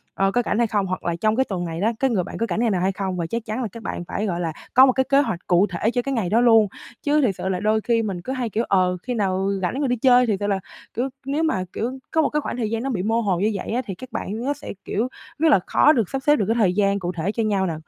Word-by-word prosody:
ờ, 195 0 +2
có 245 - +2
rảnh - - 0
hay 235 -1 +3
không? 205 -2 0
Hoặc 185 - -4
là 170 - 0
trong 215 0 +2
cái 265 +2 +2
tuần 180 -6 -3
này 165 0 -5
đó, 225 - +2
cái 270 - +2
người 195 -7 +1
bạn - - -7
có 230 - 0
rảnh 175 - -1
ngày 235 -1 +2
nào 185 -3 0
hay 190 - +2
không? 190 -1 -3
Và 170 - -2
chắc 230 +4 -4
chắn 220 +4 -3
là 230 - -1
các 230 +2 -10
bạn 175 - -4
phải, 210 - -2
gọi 175 -4 -2
là, 165 -2 -2 0.2
có 260 +1 +8
một 265 - +4
cái 265 - +2
kế 280 0 +5
hoạch 185 -11 -2
cụ 180 +4 +4
thể 195 +5 -1
cho 245 - 0
cái 275 +2 -3
ngày 215 -8 -1
đó 225 +3 +3
luôn. 225 -3 +6 0.4
Chứ 300 0 +3
thiệt 220 -8 +1
sự 190 - -3
là 185 - -1
đôi 215 +2 +1
khi 230 0 +1
mình 190 -5 -3
cứ 260 - -4
hay, 250 -3 -2
kiểu, 225 +3 -1
ờ, 185 -2 +2
khi 250 - -3
nào 195 -3 0
rảnh 245 +10 -1
rồi 280 - +1
đi 245 - +1
chơi, 250 +1 +5
thiệt 210 -3 +1
sự 205 - -1
là, 200 -1 0 0.3
kiểu, 250 +4 -1 0.2
nếu 290 +4 -1
mà, 190 -13 0
kiểu, 255 +4 -3
có 320 - +3
một - - +1
cái 300 - -1
khoảng - - -4
thời 225 -4 -1
gian 230 +1 -2
nó 270 - -2
bị 205 -8 -2
mơ 225 +3 +1
hồ 195 -6 0
như 210 +3 +2
vậy - - -4
á, 245 +3 0
thì 195 - -4
các 255 +7 -11
bạn 220 +5 -4
á 285 - +2
sẽ, 290 -5 -8
kiểu, 225 +4 -1 0.3
rất 320 0 +4
là 265 - +6
khó 300 - +5
được 225 -7 0
sắp 270 0 -4
xếp 295 - +6
được 205 - 0
cái 225 - +1
thời 195 -6 +3
gian 200 0 +2
cụ 175 -1 -3
thể 175 +3 -2
cho 225 0 -1
nhau 200 -3 +1
nè. 165 - -2
215 Hz, 335 wpm, -23 LUFS, 190-245 Hz, 0.4 s, có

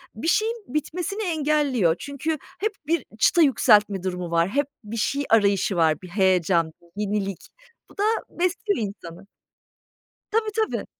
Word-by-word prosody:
bir 225 +9 -4
şeyin 435 +6 +2
bitmesini 360 - -3
engelliyor. 295 - +1
Çünkü 285 +3 -3 0.2
hep 430 +2 0 0.2
bir 335 +1 0
çıta 345 - +4
yükseltme 210 - +4
durumu 180 -2 -3
var. 170 +2 +2
Hep 285 +5 0 0.2
bir 220 +2 -6
şey 280 +6 0
arayışı 200 -3 +3
var. 160 -3 +2
Bir 185 - -10
heyecan, 180 -3 +2
bir 170 +4 -9
yenilik. 200 -2 -3 0.4
Bu - - -19
da 405 - 0 0.3
besliyor 365 +3 -1
insanı. 185 -1 -11 1.0
Tabii, 440 0 +1
tabii. 440 -1 -1
220 Hz, 140 wpm, -24 LUFS, -, 1.0 s, çıta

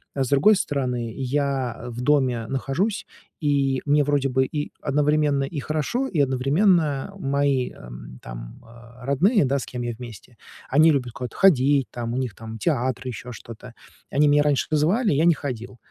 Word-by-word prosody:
А 135 - +1
с 130 - -3
другой 145 +10 +5
стороны, 125 - -2
я 135 -2 -2
в 120 +1 -6
доме 125 -5 +1
нахожусь, 140 - -1 0.3
и 140 -3 +1
мне 145 0 +3
вроде 140 -1 +1
бы 130 +1 +2
и 145 +2 -4
одновременно 150 0 +1
и 145 +2 -4
хорошо, 155 - -2
и 170 - -2
одновременно 145 +4 +2
мои, 140 -3 0
эм, - - -11
там, - - -10
э, 120 +2 -15
родные, 175 - +3
да, 135 +1 0
с - - -6
кем 125 -1 -6
я 120 0 -3
вместе, 120 +1 -11 0.4
они 155 +3 +6
любят 130 -4 -1
куда-то 125 -2 -7
ходить, 140 -7 +4
там, 120 -1 -4
у - - -2
них 130 -5 -2
там 110 0 -8
театр, 130 -1 -1
ещё 125 0 -6
что-то. 115 +1 -11 0.4
Они 150 +1 +3
меня 145 0 +4
раньше 145 -2 +1
вызывали, 170 +8 +2
я 150 +4 +2
не 170 - +6
ходил. 125 -4 -6
135 Hz, 175 wpm, -23 LUFS, 125-150 Hz, 0.4 s, они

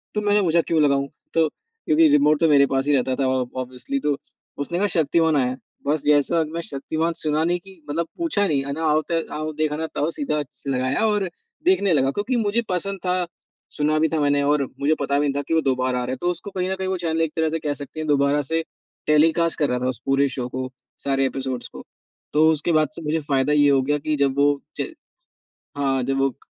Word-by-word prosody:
तो 210 - +1
मैंने 205 0 +3
पूछा, 170 -2 +3
"क्यों 160 -1 +1
लगाऊँ?" 140 -1 +2 0.3
तो 160 -1 +4
क्योंकि 445 - +1
रिमोट 150 +1 +4
तो 165 - +4
मेरे 140 -1 +6
पास 135 +1 +1
ही 145 - +4
रहता 130 0 +1
था - - +2
ऑब 130 -1 -1
ऑब्वियसली, 130 - -3
तो 150 - 0 0.5
उसने 170 +4 -3
कहा 205 - +2
शक्तिमान 160 0 +3
आया 130 - +3
है, 130 +1 -3 0.3
बस 150 0 +1
जैसा 150 +3 +3
मैं 170 - -2
शक्तिमान 160 +2 -2
सुना 155 0 +1
नहीं 175 +2 +1
कि 190 0 -16
मतलब 165 +3 -1
पूछा 295 -13 +1
नहीं, 140 -5 +1
है 140 - -3
ना, 160 +3 -4
आओ 155 0 +3
ते 165 -1 +1
आओ 155 +1 -3
देखा 150 0 -1
ना 160 +1 -2
ताओ, 150 - 0
सीधा 250 - -1
च 145 - -25
लगाया 130 +7 0
और 205 -3 0 0.4
देखने 345 - +3
लगा 135 -2 +2
क्योंकि 210 - -2
मुझे 220 +1 +1
पसंद 190 +2 -2
था, 180 0 +1 0.5
सुना 155 +1 +2
भी 160 - +2
था 160 - +1
मैंने 145 0 +2
और 145 0 +2 0.2
मुझे 150 +3 +3
पता 140 0 +1
भी 145 - +1
नहीं 140 - 0
था - - 0
कि - - -1
वो 160 - +4
दोबारा 130 -2 0
आ - - -2
रहा 125 - -3
है। 130 - -3
तो 175 - +1
उसको 180 +4 -7
कहीं 185 -1 -2
न - - 0
कहीं 190 0 -3
वो 190 - -1
चैनल 165 -2 -1
एक 160 -2 0
तरह 160 -1 +1
से 165 +1 -2
कह 150 -2 -2
सकते 145 +2 -8
हैं 155 - -4
दोबारा 140 0 +3
से 165 0 +1 0.4
टेलीकास्ट 160 +2 +3
कर 145 - +2
रहा 125 - 0
था 125 - -1
उस 125 - -4
पूरे 135 +1 +3
शो 125 -2 -4
को, 130 0 -4 0.4
सारे 135 -1 +2
एपिसोड्स 130 -2 -4
को, - - -11 0.5
तो 155 +2 +5
उसके 160 +2 0
बाद 155 -2 +3
से - - -7
मुझे 155 +1 0
फ़ायदा 140 0 +1
ये 145 -1 +5
हो 135 -1 +4
गया 145 +2 +1
कि 155 +1 -1
जब 140 -1 +1
वो 145 0 +3 0.2
च - - -1 0.9
हाँ, 135 -2 +1
जब 135 +2 -1
वो 135 0 +3
क - - -27
150 Hz, 245 wpm, -23 LUFS, 140-165 Hz, 0.9 s, मेरे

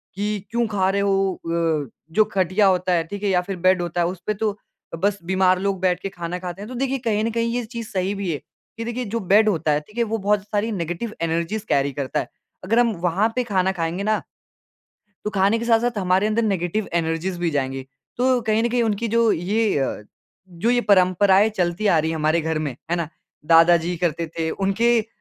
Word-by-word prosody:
कि 210 +1 -2
क्यों 235 0 +1
खा 195 -3 +1
रहे 200 +1 +1
हो 195 -1 +1
अ, 165 -4 -1 0.2
जो 215 +6 +4
खटिया 190 +2 +3
होता 185 -1 +2
है, 165 -1 +2
ठीक 200 +5 -8
है? 205 - +1
या 180 -2 +3
फिर 195 +2 -5
बेड 185 0 +3
होता 175 0 -2
है 170 - +2
उसपे 180 +3 -3
तो 210 0 -2 0.4
बस 200 +4 0
बीमार 185 +1 +2
लोग 195 -1 -1
बैठ 180 -1 +2
के 195 - -3
खाना 175 -1 -5
खाते 180 +1 -6
हैं 205 - -7
तो 255 - -7
देखिए 270 +2 -1
कहीं 220 -3 0
न 230 - 0
कहीं 230 +1 -1
ये 245 -2 -2
चीज़ 230 -1 -7
सही 190 +1 -1
भी 195 -4 -2
है, 150 - -2 0.4
कि 230 - -4
देखिए 240 +1 -3
जो 230 +2 -2
बेड 210 +2 +4
होता 160 -5 0
है 145 - +2
ठीक 210 +9 -19
है? 235 - +3
वो 225 0 -2
बहुत 205 -1 +1
सारी 210 +2 -2
नेगेटिव 175 +4 -4
एनर्जीज़ 170 +6 -1
कैरी 140 0 +2
करता 135 -1 -2
है। - - -4 0.4
अगर 225 +6 +2
हम 240 -1 +3
वहाँ 180 +5 +2
पे 250 - +1
खाना 190 -4 +1
खाएँगे 170 +1 -2
ना 215 +1 +1 1.1
तो - - 0
खाने 200 +4 +3
के 230 - -4
साथ-साथ 235 0 +2
हमारे 185 +1 +2
अंदर 215 +2 +1
नेगेटिव 195 0 -1
एनर्जीज़ 170 +2 -1
भी 175 -1 0
जाएँगी, 135 -2 -2 0.3
तो 250 0 +2
कहीं 220 0 +1
न 235 - +1
कहीं 245 0 +1
उनकी 225 0 0
जो 230 -1 +4
ये 205 +3 0
अ, 135 -5 -2 0.5
जो 180 +6 -1
ये 245 0 +3
परम्पराएँ 190 +2 +5
चलती 175 +3 0
आ 175 -5 +4
रही 160 +1 0
है 165 - -2
हमारे 155 +2 +2
घर 160 0 -1
में, 155 -2 -2 0.2
है 175 - +2
ना? 170 -3 -2 0.4
दादाजी 170 +2 +5
करते 165 0 0
थे 160 -1 0
उनके 225 +6 +2
अ, 215 - -9
195 Hz, 225 wpm, -22 LUFS, 170-215 Hz, 1.1 s, परम्पराएँ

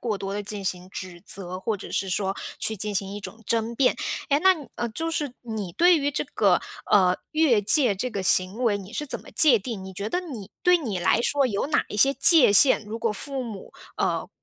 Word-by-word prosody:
过 220 -4 -2
多 195 0 -5
地 205 - -3
进 205 -1 -6
行 180 -1 -3
指 180 -2 -8
责， 185 -1 -7
或 215 +2 -2
者 200 - -10
是 195 - -1
说 195 +1 -1 0.2
去 220 - -1
进 210 +1 -3
行 195 0 -2
一 205 - -6
种 220 +2 -10
争 230 0 -1
辩。 255 0 +3 0.3
诶， 285 0 +2
那 380 +2 +5
你 300 -5 -10 0.3
就 325 0 -2
是 295 -5 -2
你 220 -6 -5
对 350 - +5
于 285 -2 0
这 290 - -2
个， - - +3 0.3
呃， 185 -3 +4
越 290 -9 +3
界 245 0 +3
这 250 +7 -3
个 200 -4 -4
行 185 +2 +3
为 215 -4 +2
你 200 +1 -10
是 295 - -4
怎 - - -4
么 - - -15
界 295 -6 +5
定？ 200 -2 -6
你 190 - -8
觉 200 +3 -4
得 355 - -1
你 240 - -9
对 360 0 +5
你 220 - -3
来 225 - +2
说 280 +1 +2
有 215 +3 -2
哪 300 - +1
一 - - -6
些 275 +6 +5
界 280 - +6
限， 220 +1 +5
如 225 +2 -5
果 225 -2 0
父 270 +5 -5
母， 215 -5 -9 0.2
呃， - - -1
220 Hz, 250 characters per minute, -25 LUFS, 195-275 Hz, 0.3 s, 界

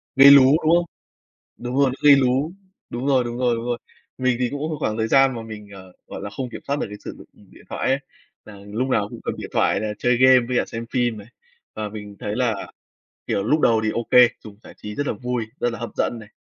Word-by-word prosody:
Gây 140 +1 +9
lú, 140 -2 +9 0.2
đúng 165 +2 +4
không? 175 0 +2 0.7
Đúng 125 +1 -5
rồi, 140 -2 +4
nó 130 - -5
gây 140 - +10
lú. 135 +4 +1 0.4
Đúng 120 +3 -5
rồi, 130 -3 +3
đúng 120 0 -5
rồi, 125 -2 +1
đúng 115 +1 -5
rồi. 120 -1 -1 0.4
Mình 130 -1 +1
thì 125 -1 0
cũng 145 - -4
một 155 - -3
khoảng 110 +1 -2
thời 110 0 0
gian 135 0 +4
mà 115 - -5
mình, 110 -2 -10
ờ, 95 -1 -13
gọi - - -8
là, 100 - -5
không 125 +4 -5
kiểm - - -9
soát 140 +1 -1
được - - -1
cái 105 - -8
sử - - -6
dụng - - -14
điện - - -19
thoại - - -2
ấy, 135 +1 +2 0.5
là 105 -2 -12
lúc 115 +6 -2
nào 105 -5 0
cũng - - -9
cầm - - -3
điện - - -7
thoại - - +2
là 105 -1 -3
chơi 125 0 +1
game 130 0 +7
với 125 -1 0
cả - - +1
xem 115 0 -6
phim 120 -3 0
này. 105 0 -11 0.5
Và 105 -1 -4
mình 105 -1 -9
thấy 105 +1 -4
là, 120 -5 -2 0.6
kiểu, 100 - -1
lúc 150 +9 +1
đầu 115 -1 +3
thì 110 - +1
OK, 120 +1 +5
dùng 105 -2 -12
giải - - -14
trí 105 0 -8
rất 145 - -3
là - - 0
vui, 125 +1 -3 0.2
rất 120 - +1
là - - -6
hấp 120 - -5
dẫn 120 - -1
này. 105 - -13
120 Hz, 265 wpm, -22 LUFS, 110-130 Hz, 0.7 s, gây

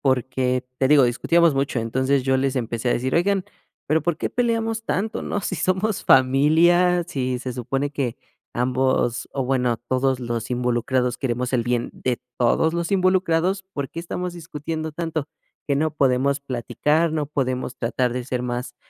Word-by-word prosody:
Porque, 130 -1 0
te 130 - +3
digo, 145 0 +6
discutíamos 165 +6 +3
mucho, 135 -3 0
entonces, 130 +4 +1
yo 130 0 +2
les 135 0 0
empecé 120 0 -2
a - - +4
decir: 130 +2 -1
"Oigan, 195 +2 +2 0.4
pero 155 +2 +2
¿por 170 0 0
qué - - -3
peleamos 225 -2 0
tanto?, 215 +1 -2
¿no?, 205 - -2
si - - -3
somos 190 +3 0
familia, 165 +7 +4
si 130 -7 -2
se 130 -1 -4
supone 135 +4 -2
que 135 -5 -2 0.4
ambos, 125 -1 0
o 135 - -1
bueno, 125 -2 +1
todos 130 +3 0
los 120 -1 -3
involucrados 125 0 0
queremos 125 -1 -2
el 120 -3 +1
bien 120 0 -1
de 125 -2 -2 0.2
todos 160 +7 +2
los 170 +3 -2
involucrados, 185 0 +2
¿por 140 -2 -3
qué 165 - -8
estamos 180 +1 -4
discutiendo 160 -1 -5
tanto?, 160 -2 -3 0.4
¿que 140 - +1
no 155 +2 0
podemos 140 0 +2
platicar, 150 +5 0
no 150 -2 -1
podemos 130 -4 -2
tratar 120 +1 0
de 125 0 -3
ser 125 -1 -2
más 120 0 -4
135 Hz, 170 wpm, -23 LUFS, 125-165 Hz, 0.4 s, digo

